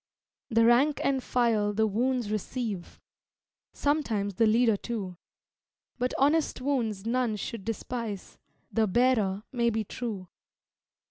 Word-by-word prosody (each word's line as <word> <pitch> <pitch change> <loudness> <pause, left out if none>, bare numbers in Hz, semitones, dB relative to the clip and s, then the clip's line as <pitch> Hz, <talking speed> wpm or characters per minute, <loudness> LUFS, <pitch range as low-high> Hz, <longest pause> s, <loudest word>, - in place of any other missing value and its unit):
The 230 -1 +4
"rank 265 +6 +4
and 270 -1 +1
file" 225 -5 +1
the 220 +2 +2
wounds 235 +1 0
receive; 215 -3 -4 0.7
Sometimes 230 -9 0
the 225 +4 +3
leader, 225 0 +4
too; 200 -4 -5 0.8
But 250 +1 -1
honest 295 +2 +2
wounds 235 -7 -1
none 240 -1 +1
should 210 0 -5
despise; 225 -2 -5 0.3
The 220 -1 +2
bearer 215 -3 +2
may 235 -3 +2
be 220 -1 -1
true. 210 -4 -5
230 Hz, 120 wpm, -28 LUFS, 210-250 Hz, 0.8 s, The